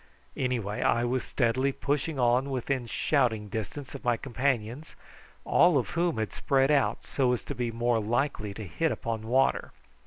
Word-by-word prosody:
Anyhow 125 Hz, -5 st, -1 dB
I 115 Hz, +3 st, +1 dB
was 125 Hz, +1 st, 0 dB
steadily 130 Hz, +2 st, +1 dB
pushing 145 Hz, +3 st, -2 dB
on 125 Hz, +2 st, +2 dB
within 130 Hz, -1 st, -2 dB
shouting 115 Hz, -5 st, 0 dB
distance 110 Hz, +7 st, -5 dB
of 140 Hz, -, -8 dB
my 120 Hz, -1 st, +2 dB
companions, 130 Hz, +1 st, -2 dB, 0.5 s
all 175 Hz, -5 st, +5 dB
of 125 Hz, -, -1 dB
whom 170 Hz, -3 st, 0 dB
had 110 Hz, -1 st, -2 dB
spread 135 Hz, +1 st, +2 dB
out 140 Hz, -3 st, +2 dB
so 130 Hz, -3 st, +1 dB
as 125 Hz, -, -3 dB
to -, -, -5 dB
be 120 Hz, -2 st, -2 dB
more 120 Hz, 0 st, +1 dB
likely 110 Hz, -1 st, -1 dB
to 110 Hz, -, -6 dB
hit 155 Hz, -, -1 dB
upon 110 Hz, -1 st, -4 dB
water. 130 Hz, +3 st, +1 dB
125 Hz, 165 wpm, -28 LUFS, 115-140 Hz, 0.5 s, all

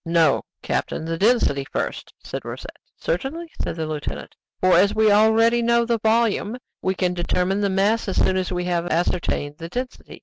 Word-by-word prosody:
"No, 165 Hz, -3 st, +3 dB, 0.2 s
captain, -, -, -2 dB
the 165 Hz, 0 st, -2 dB
density 195 Hz, -, +2 dB
first," -, -, -4 dB
said -, -, -6 dB
Rosette. -, -, -8 dB, 0.2 s
"Certainly," 310 Hz, -, -3 dB
said -, -, -3 dB
the 160 Hz, -1 st, -3 dB
lieutenant; 155 Hz, -2 st, -5 dB, 0.3 s
"for, 185 Hz, 0 st, +4 dB
as 200 Hz, +5 st, +4 dB
we 215 Hz, -1 st, +4 dB
already 225 Hz, +3 st, +4 dB
know 235 Hz, 0 st, +3 dB
the 230 Hz, -1 st, 0 dB
volume, 220 Hz, 0 st, +1 dB, 0.2 s
we 190 Hz, 0 st, 0 dB
can 180 Hz, -1 st, 0 dB
determine 180 Hz, +3 st, 0 dB
the 200 Hz, -, +1 dB
mass 200 Hz, +4 st, +1 dB
as 190 Hz, -, -2 dB
soon 185 Hz, -, +3 dB
as 185 Hz, -1 st, -1 dB
we 180 Hz, -1 st, -1 dB
have 175 Hz, -1 st, -1 dB
ascertained 165 Hz, -3 st, -1 dB
the 165 Hz, 0 st, -7 dB
density." 250 Hz, +5 st, -6 dB
190 Hz, 180 wpm, -22 LUFS, 170-225 Hz, 0.3 s, for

